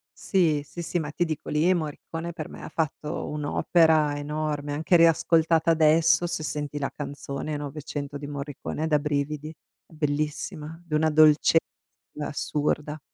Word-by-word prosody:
Sì. 165 -7 +1
Sì, 170 +4 -8
sì. 170 +1 -2
Ma 150 -1 -4
ti 175 +3 0
dico, 155 -3 -5
lì, 155 +5 +3
Morricone 165 +1 -4
per 155 -3 -6
me - - -10
ha - - -7
fatto 155 0 -3
un'opera 150 0 +2
enorme. 150 0 -3
Anche 160 +4 +2
riascoltata 165 0 +4
adesso, 160 +1 +4
se 160 -2 -3
senti 145 0 -3
la 135 - -2
canzone 145 +1 -5
Novecento 145 0 -5
di 145 0 -7
Morricone 145 +1 -5
è - - 0
da 150 -2 +3
brividi. 150 +1 -2 0.3
È - - -21
bellissima, 150 +2 -3
di 155 - -8
una 155 +1 +3
dolce 155 +1 +5 0.6
assurda. 150 +1 -2
150 Hz, 150 wpm, -26 LUFS, 145-160 Hz, 0.6 s, dolce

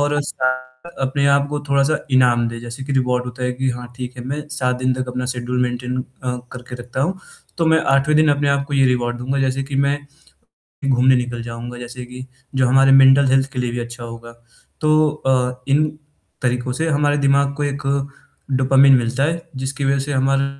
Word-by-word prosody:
और 145 0 +1
साथ 130 -2 -1 0.4
अपने 135 +1 +1
आप 140 0 +3
को 150 - -2
थोड़ा-सा 140 +2 +2
इनाम 125 -2 +4
दें। 115 - -6
जैसे 120 +3 -8
कि 140 - -4
रिवॉर्ड 125 -1 +1
होता 125 0 -7
है 125 - 0
कि 130 +1 -2
हाँ, 125 0 -6
ठीक 125 0 -6
है 125 - -7
मैं 145 +3 -4
7 125 -4 -1
दिन 130 0 +1
तक 130 0 -4
अपना 125 0 -3
शेड्यूल 125 +1 -2
मेंटेन 125 0 -2 0.3
अ, 125 -1 -2 0.2
करके 125 0 -9
रखता 125 +2 -5
हूँ, 185 +6 -1 0.4
तो 165 - +2
मैं 160 0 +4 0.2
8वें 140 +2 +3
दिन 155 0 +4
अपने 145 0 +1
आप 140 0 +1
को 145 - -2
ये 135 -1 +4
रिवॉर्ड 120 -1 0
दूँगा, 135 +3 -2
जैसे 135 0 0
कि 140 +1 -7
मैं 140 +1 +2 0.9
घूमने 130 0 +4
निकल 120 -1 -2
जाऊँगा, 120 +1 -7
जैसे 125 +1 -8
कि 125 +1 -9 0.3
जो 130 -1 +3
हमारे 135 +1 +5
मेंटल 135 +1 +7
हेल्थ 135 +1 +2
के 125 - -3
लिए 125 -1 -1
भी 120 - -3
अच्छा 120 0 -7
होगा। 115 0 -9 0.5
तो 155 0 +4
अ, 130 -3 -1
इन 145 +3 +3 0.6
तरीकों 125 0 -1
से 160 +4 -1
हमारे 145 -1 +2
दिमाग 140 0 +3
को 145 - -2
एक 145 0 -2 0.7
डोपामाइन 135 +1 +5
मिलता 125 +3 -1
है 170 +3 0
जिसकी 135 +2 -3
वज़ह 140 0 +2
से 145 - -4
हमारा 135 +1 +2
130 Hz, 205 wpm, -20 LUFS, 125-140 Hz, 0.9 s, मेंटल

